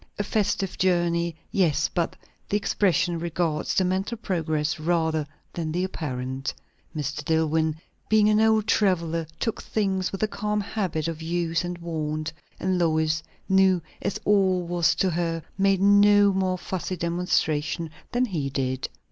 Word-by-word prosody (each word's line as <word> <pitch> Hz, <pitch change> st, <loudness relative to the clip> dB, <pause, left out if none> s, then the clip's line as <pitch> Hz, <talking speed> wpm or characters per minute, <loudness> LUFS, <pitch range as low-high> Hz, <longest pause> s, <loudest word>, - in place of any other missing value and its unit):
A 205 Hz, -, 0 dB
festive 200 Hz, -2 st, -1 dB
journey, 170 Hz, -2 st, +1 dB, 0.2 s
yes; 165 Hz, -, +2 dB
but 170 Hz, -2 st, -2 dB, 0.3 s
the 205 Hz, -, +2 dB
expression 180 Hz, -4 st, +1 dB
regards 165 Hz, -2 st, -1 dB
the 185 Hz, -, +3 dB
mental 190 Hz, +5 st, -1 dB
progress 160 Hz, -7 st, -1 dB
rather 160 Hz, -2 st, 0 dB, 0.3 s
than 160 Hz, -2 st, -3 dB
the 180 Hz, +3 st, 0 dB
apparent. 135 Hz, -6 st, -4 dB, 0.4 s
Mr. 150 Hz, -1 st, -3 dB
Dillwyn, 160 Hz, 0 st, +1 dB, 0.3 s
being 215 Hz, -1 st, +5 dB
an 215 Hz, 0 st, +4 dB
old 220 Hz, -1 st, +4 dB
traveller, 170 Hz, -7 st, +1 dB
took 225 Hz, -, -2 dB
things 190 Hz, -3 st, -1 dB
with 195 Hz, -, -5 dB
the 215 Hz, -, +3 dB
calm 210 Hz, -1 st, -2 dB
habit 190 Hz, -7 st, -2 dB
of 165 Hz, -1 st, -4 dB
use 165 Hz, +1 st, -1 dB
and 175 Hz, 0 st, -4 dB
wont; 155 Hz, -2 st, -3 dB, 0.3 s
and 185 Hz, -1 st, 0 dB
Lois, 160 Hz, -1 st, +2 dB, 0.3 s
new 190 Hz, -1 st, +4 dB, 0.2 s
as -, -, -2 dB
all 190 Hz, -3 st, +3 dB
was 175 Hz, -1 st, +2 dB
to 190 Hz, -, +1 dB
her, 165 Hz, -1 st, -1 dB
made 195 Hz, -1 st, +3 dB
no 205 Hz, 0 st, +6 dB
more 185 Hz, -1 st, 0 dB
fussy 185 Hz, 0 st, -4 dB
demonstration 165 Hz, -2 st, 0 dB, 0.2 s
than 245 Hz, +1 st, +2 dB
he 160 Hz, -, -2 dB
did. 130 Hz, -2 st, -2 dB
175 Hz, 150 wpm, -25 LUFS, 160-195 Hz, 0.4 s, no